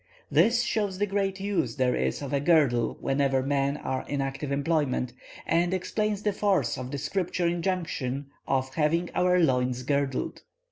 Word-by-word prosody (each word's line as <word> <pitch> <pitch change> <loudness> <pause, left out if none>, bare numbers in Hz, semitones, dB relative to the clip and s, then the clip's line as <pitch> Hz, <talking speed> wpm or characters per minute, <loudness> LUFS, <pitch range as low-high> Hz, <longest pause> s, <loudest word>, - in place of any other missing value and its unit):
This 235 +1 +4
shows 205 -5 -1
the 205 - +1
great 195 -1 -1
use 200 0 -1
there 130 -2 +2
is 65 - -1
of 140 - -5
a 140 - +2
girdle 140 -7 +3
whenever 135 -1 +1
men 140 +1 0
are 130 -2 -3
in 145 - -2
active 135 +1 -3
employment, 140 -4 0 0.3
and 175 +2 +2
explains 210 +2 -1
the 210 - +1
force 190 - +1
of 125 0 -6
the 140 - -4
Scripture 175 +5 -1
injunction 170 -6 -2 0.2
of 130 -1 0
having 165 +3 +1
our 180 0 +3
loins 125 -5 +1
girded. 140 -1 -1
145 Hz, 160 wpm, -27 LUFS, 135-185 Hz, 0.3 s, This